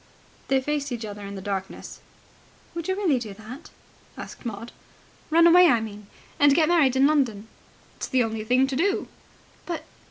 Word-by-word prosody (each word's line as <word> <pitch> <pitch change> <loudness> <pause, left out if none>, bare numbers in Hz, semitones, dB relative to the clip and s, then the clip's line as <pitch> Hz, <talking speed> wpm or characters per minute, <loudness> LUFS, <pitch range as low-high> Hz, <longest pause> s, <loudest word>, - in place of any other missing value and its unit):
They 270 0 +3
faced 290 0 -2
each 235 -2 -4
other 205 -1 -8
in 200 0 -7
the 190 - -8
darkness. 195 -1 -5 0.7
"Would 335 -1 -5
you 375 - 0
really 350 -10 +1
do 215 -4 -7
that?" 230 +8 -11 0.5
asked - - -8
Maud. 230 +1 -7 0.6
"Run 335 +2 +5
away, 355 +1 +7
I 245 -7 +4
mean, 210 -2 -8 0.3
and 285 -1 +5
get 315 -1 +4
married 295 -7 +3
in 265 +1 +4
London." 250 -8 +1 0.5
"It's - - -4
the 260 -2 +2
only 225 -1 -3
thing 250 +4 +3
to 270 0 -4
do." 390 +8 0 0.6
"But 340 -2 -4
260 Hz, 180 wpm, -25 LUFS, 220-310 Hz, 0.7 s, away